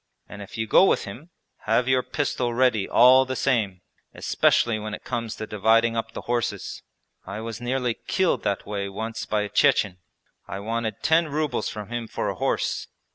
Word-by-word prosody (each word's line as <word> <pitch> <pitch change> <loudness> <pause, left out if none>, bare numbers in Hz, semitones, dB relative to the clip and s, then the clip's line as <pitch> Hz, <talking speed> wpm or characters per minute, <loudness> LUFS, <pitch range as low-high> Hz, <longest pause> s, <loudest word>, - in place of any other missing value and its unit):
And 100 - -10
if 100 - -9
you 110 - -1
go 110 - +6
with - - +2
him, 125 - -9 0.4
have 115 +3 +2
your 130 -1 +3
pistol 125 -3 -2
ready 120 -5 +2
all 130 +2 +7
the 130 0 -4
same, 110 -9 0 0.3
especially 115 -2 +2
when 105 0 -4
it - - -14
comes 115 -3 -3
to 110 - -5
dividing 115 +2 +2
up 115 0 -3
the - - -6
horses. 120 -1 -3 0.5
I 100 +2 -5
was 115 0 -6
nearly 125 -1 -1
killed 190 -2 +1
that 100 - -2
way 100 -1 -3
once 110 +3 -5
by 105 -1 +1
a 105 - -5
Chechen. 95 -2 +2 0.5
I 95 - -5
wanted 110 0 -3
ten 160 +1 +4
rubles 150 0 -1
from 105 -1 -7
him 120 -1 -4
for - - -3
a - - -3
horse. - - -1
115 Hz, 185 wpm, -25 LUFS, 105-125 Hz, 0.5 s, all